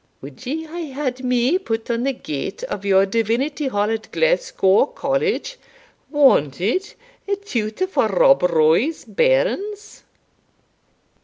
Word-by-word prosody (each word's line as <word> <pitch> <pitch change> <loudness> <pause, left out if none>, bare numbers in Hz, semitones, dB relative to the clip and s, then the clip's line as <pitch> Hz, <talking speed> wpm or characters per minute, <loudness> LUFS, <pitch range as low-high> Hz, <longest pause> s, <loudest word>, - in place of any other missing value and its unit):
wad 140 - -11
ye 315 +5 -3
hae 330 +1 -6
had 260 -3 -3
me 250 +7 +2
put 225 -9 -3
on 235 0 -1
the 275 +2 0
gate 175 - -6
o' 200 - -3
your 195 -1 +3
Divinity 230 +8 -1
Hall 210 -3 0
at 220 -1 -5
Glasgow 485 - +2
College, - - -2 0.5
'Wanted, 260 - +2 0.3
a 400 - +1
tutor 250 - -3
for 300 -11 +1
Rob 215 +7 +4
Roy's 170 - +2
bairns?'" 480 -4 0
260 Hz, 125 wpm, -21 LUFS, -, 0.5 s, Rob